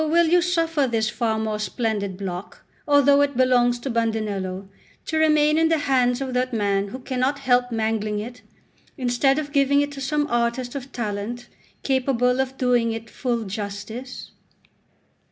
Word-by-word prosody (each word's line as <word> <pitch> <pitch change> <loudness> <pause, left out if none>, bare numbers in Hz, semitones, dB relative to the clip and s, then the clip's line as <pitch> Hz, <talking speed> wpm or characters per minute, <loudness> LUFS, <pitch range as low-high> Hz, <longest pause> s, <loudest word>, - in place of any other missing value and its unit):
will 335 0 +4
you 355 +1 +5
suffer 330 -5 +1
this 220 -2 0
far 225 -3 -1
more 215 -1 -2
splendid 210 -4 -2
block, 185 -1 -7 0.2
although 285 -1 +5
it 285 -3 0
belongs 245 -1 +3
to 240 - -7
Bandinello, 210 -5 -2 0.4
to 315 - -2
remain 305 0 +4
in 325 0 +3
the 325 - +3
hands 255 -3 +1
of 260 -1 -3
that 255 +1 0
man 200 -3 0
who 210 - -7
cannot 260 +2 -1
help 250 -2 +1
mangling 220 -2 -1
it, 240 +4 -7 0.6
instead 260 +2 +2
of 295 -1 -3
giving 280 0 +3
it 290 0 0
to 280 -1 -8
some 295 +2 0
artist 240 -1 -1
of 270 -1 -7
talent 220 +1 -4 0.4
capable 255 -1 +1
of 265 0 -4
doing 245 -2 +2
it 225 0 -6
full 240 -3 -2
justice? 210 +5 -6
245 Hz, 160 wpm, -23 LUFS, 220-275 Hz, 0.6 s, you